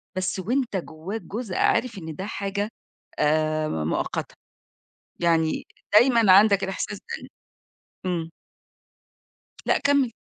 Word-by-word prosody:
بس 185 +1 -1
وأنت 245 +4 -1
جوّاك 180 +5 -6
جزء 210 -2 -5
عارف 230 -4 +2
إن 160 -4 -7
ده 190 - -5
حاجة 200 0 -3 0.5
آآ، 155 +1 +2
ما 80 - -2
مؤقتة 80 - -2 0.9
يعني 165 -2 +1 0.3
دايمًا 230 -2 +6
عندك 200 0 +6
الإحساس 190 +1 -3
ده - - -49 0.2
إن - - -9 0.8
إمم. 170 -3 -1 1.4
لأ - - +3
كمّل. 280 -4 +2
190 Hz, 115 wpm, -25 LUFS, 160-220 Hz, 1.4 s, دايمًا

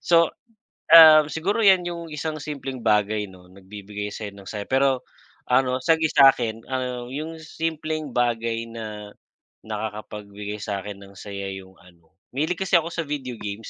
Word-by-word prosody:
so, 170 -1 +3 0.6
ah, 155 -2 +10
siguro 195 +9 -1
yan 190 -4 +5
yung 170 -1 -5
isang 155 0 -4
simpleng 135 -4 -6
bagay 105 -1 +1
no, 90 -1 -16
nagbibigay 100 +2 -8
sa'yo 105 -1 -7
ng 100 -1 -12
saya. 105 -2 -5
Pero, 130 -1 +1 0.4
ano 125 0 +2
sa 165 +5 +3
gi 160 -1 +1
sa'kin, 120 -5 +4
ah, 125 -2 -3
yung 160 +3 -5
simpleng 155 -1 -4
bagay 115 -1 0
na 105 -2 -8 0.5
nakakapagbigay 105 -1 -6
sa'kin 100 -1 -5
ng 100 0 -14
saya 100 -1 -6
yung 95 -1 -11
ano, 85 0 -23 0.2
mahilig 155 +6 -1
kasi 185 - -7
ako 165 0 -1
sa 165 -1 -4
video 135 -5 -5
games, 105 +1 -6
120 Hz, 155 wpm, -24 LUFS, 105-155 Hz, 0.6 s, ah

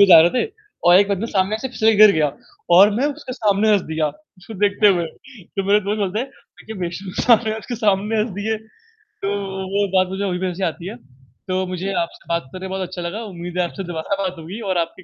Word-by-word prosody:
पे 200 - +9
जा 165 -2 +11
रहे 170 - +4
थे - - +2 0.4
और 175 - +8
1 200 - +3
बंदा 200 -1 -1
ना 230 - -2
सामने 195 +2 +1
से 265 - -2
फिसल 220 - -1
के 220 - +1
गिर 210 -1 +8
गया 150 -1 +3 0.5
और 200 +3 +8
मैं 280 - +2
उसके 280 -3 -8
सामने 215 -3 +2
हँस 205 - +4
दिया 155 -1 0 0.3
उसको 205 +4 -11
देखते 205 +1 +3
हुए। 170 - 0
तो 195 - -8
मेरे 210 - +5
दोस्त 210 +1 0
बोलते 200 +2 -1
हैं 265 - -3 0.3
तू - - -17
क्या 220 -1 -7
बेशरम 175 +3 -5
इंसान 235 -2 +4
है 220 0 -1
उसके 240 +2 -6
सामने 210 0 +1
हँस 220 - -1
दिए। 220 +1 -1
तो 220 - -26 0.9
वो 205 0 +2
बात 185 0 +4
मुझे 200 - -3
अभी 180 - -1
भी - - +1
ऐसी 190 +2 -5
आती 170 +1 -3
है। 220 - -7 0.6
तो 185 0 0
मुझे 190 +2 -3
आपसे 170 - -11
बात 170 -6 -2
करने 185 +1 -6
में - - -9
बहुत 185 -2 -3
अच्छा 180 0 -7
लगा। 185 +7 -4
उम्मीद 175 +1 -7
है - - +3
आपसे 195 +3 -6
दोबारा 165 +4 -2
बात 185 -1 -2
होगी 175 +8 -7
और 180 - +1
आपकी 170 +2 -3
195 Hz, 250 wpm, -21 LUFS, 180-215 Hz, 0.9 s, जा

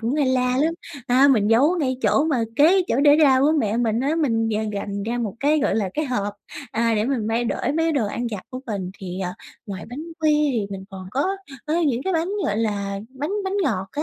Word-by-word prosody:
cũng 235 +4 -1
hay 295 -2 +2
la 255 -1 +1
lắm. 320 +4 +1 0.3
A, 260 +3 +5
mình 215 -6 +3
giấu 280 +10 +4
ngay 260 -4 0
chỗ 215 +7 +3
mà 265 -8 +1
kế 350 +6 +5
chỗ 245 - +1
để 290 0 +6
rau 265 -3 +5
của 300 +3 +4
mẹ 215 -3 0
mình 230 -1 +1
á, 280 +4 0
mình 230 -8 +1
d 225 - -2 0.2
gành 200 0 -4
ra 235 +3 -2
một 215 -5 -3
cái, 300 +2 +3
gọi 290 - +1
là, 210 -3 0
cái 310 - 0
hộp, 205 -7 -2 0.4
à, 230 +1 +1
để 210 0 +1
mình 245 -4 -1
mang 230 +1 0
để - - -1
mấy 325 0 +2
đồ 260 -8 +1
ăn 240 +4 -3
vặt 205 -4 -5
của 255 - -6
mình. 195 -5 -3
Thì, 185 -1 -6
ờ, 180 -1 -3 0.3
ngoài 190 -4 -6
bánh 260 +6 -7 0.2
quy 300 -1 +3
thì 220 -4 -1
mình 190 -1 -6
còn 185 -1 -9
có 290 - 0 0.3
có 305 - 0
những 255 -2 0
cái 380 - -1
bánh, 330 +1 0 0.2
gọi 210 -8 0
là, 200 -3 -1
bánh 270 +6 -5
bánh 385 +1 -2
ngọt 190 - -1
á, 300 - -2
245 Hz, 250 wpm, -22 LUFS, 210-290 Hz, 0.4 s, để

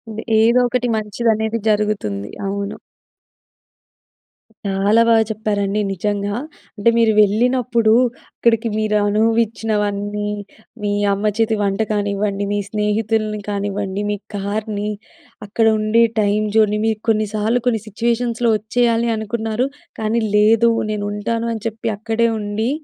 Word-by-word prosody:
The 220 - -5 0.2
ఏదో 235 +3 +5
ఒకటి 245 0 -1
మంచిదనేది 220 +1 0
జరుగుతుంది. 210 - 0 0.2
అవును. 200 +1 -3 1.9
చాలా 200 +3 +3
బాగా 225 -1 +5
చెప్పారండి. 210 -1 -1
నిజంగా. 205 +2 -2 0.4
అంటే 205 +1 +3
మీరు 225 -1 +4
వెళ్ళినప్పుడు 235 +1 +2 0.4
అక్కడికి 230 -1 +2
మీరు 215 -1 0
అనుభవిచ్చినవన్నీ, 210 -2 0 0.5
మీ 205 - -1 0.2
అమ్మ 210 +2 0
చేతి 225 -1 +2
వంట 200 +1 0
కానివ్వండి, 205 -1 -1
మీ 205 - 0
స్నేహితుల్ని 215 0 0
కానివ్వండి, 200 -1 -2
మీ - - 0 0.2
కార్‌ని, 210 +1 -3 0.6
అక్కడ 225 +3 0
ఉండే 215 +2 +3 0.2
టైమ్ 210 +1 +1
జోన్‍ని, 210 -1 +3
మీరు 220 -1 0
కొన్నిసార్లు 215 +2 +1
కొన్ని 225 -4 +1
సిట్యుయేషన్స్‌లో 235 +2 0
వచ్చేయాలి 235 +2 +1
అనుకున్నారు 220 +3 -2 0.3
కానీ 220 +2 0 0.2
లేదు. 225 +2 +5 0.2
నేను 210 -1 -3
ఉంటాను 230 +3 -2
అని 220 -2 -6
చెప్పి, 225 +1 -5
అక్కడే 225 +2 0
ఉండి, 210 +3 -2
215 Hz, 115 wpm, -19 LUFS, 205-225 Hz, 1.9 s, ఏదో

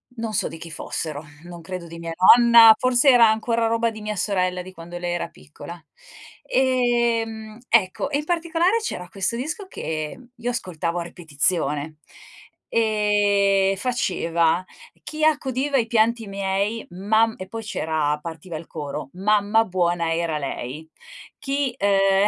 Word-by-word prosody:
non 225 -2 -4
so - - 0
di - - -8
chi 165 0 -10
fossero, 155 -1 -5 0.2
non 175 -1 -10
credo 175 0 -7
di 165 0 -10
mia 165 0 -5 0.2
nonna, 235 -2 +8
forse 255 +3 +3
era 245 -3 +7
ancora 230 +1 0
roba 230 0 +1
di 220 -1 -10
mia 210 0 -4
sorella 185 -2 -1
di 185 +1 -10
quando 175 0 -9
lei 175 0 -3
era 175 - -2
piccola. 170 +4 -12 0.6
Ehm, 235 -4 0
ecco 220 +3 +2
e 285 - 0
in 300 - -6
particolare 345 +4 +1
c'era 180 - -5
questo 195 +4 -2
disco 310 - -5
che 155 - -5 0.2
io 240 0 -4
ascoltavo 175 -7 -3
a 170 - -3
ripetizione. 155 -2 -2 0.7
Ehm, 205 -3 +2
faceva: 175 -7 0 0.4
"Chi 310 0 -5
accudiva 285 -2 +1
i 230 - +1
pianti 225 0 +1
miei 200 +3 -2
mam" 220 +5 +1
e 185 - -7
poi 225 +3 -7
c'era 155 -7 -1
partiva 165 +1 -7
il 160 - -10
coro: 150 -2 -6
"Mamma 210 +3 +2
buona 175 -3 0
era 165 -2 -1
lei, 140 +1 -6 0.5
chi" 275 -2 -1
ehm, 195 0 +3
200 Hz, 150 wpm, -23 LUFS, 170-230 Hz, 0.7 s, nonna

